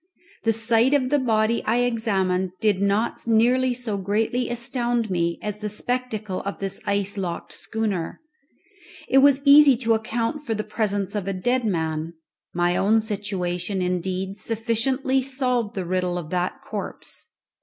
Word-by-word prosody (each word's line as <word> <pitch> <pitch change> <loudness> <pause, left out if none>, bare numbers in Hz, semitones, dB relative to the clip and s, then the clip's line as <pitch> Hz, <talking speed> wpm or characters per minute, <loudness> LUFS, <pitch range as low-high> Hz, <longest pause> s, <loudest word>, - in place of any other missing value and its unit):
The 225 - +4
sight 230 +4 +3
of 260 -2 +1
the 290 - +4
body 225 -2 +1
I 235 +3 +1
examined 190 -6 0
did 205 -3 +2
not 205 +4 0
nearly 245 +3 +3
so 235 -5 -3
greatly 220 +5 0
astound 240 -2 -1
me 170 -1 0
as 210 0 -4
the 210 0 -3
spectacle 215 -3 -3
of 200 - -5
this 195 -1 -3
ice 200 0 -1
locked 175 -3 -4
schooner. 205 -7 -3 0.9
It 270 - +5
was 280 0 +5
easy 280 -2 +8
to 230 -2 +2
account 230 +5 -2
for 230 -6 -2
the 215 - -2
presence 205 -3 -1
of 205 -3 -3
a 195 - -1
dead 245 +6 0
man. 160 -3 -2 0.4
My 175 0 +1
own 215 +4 +3
situation, 195 -3 -2
indeed, 185 +2 -2
sufficiently 235 +5 0
solved 250 -4 -1
the 190 -2 -3
riddle 180 0 -1
of 165 -3 -6
that 180 0 -2
corpse. - - -5
215 Hz, 155 wpm, -24 LUFS, 190-240 Hz, 0.9 s, easy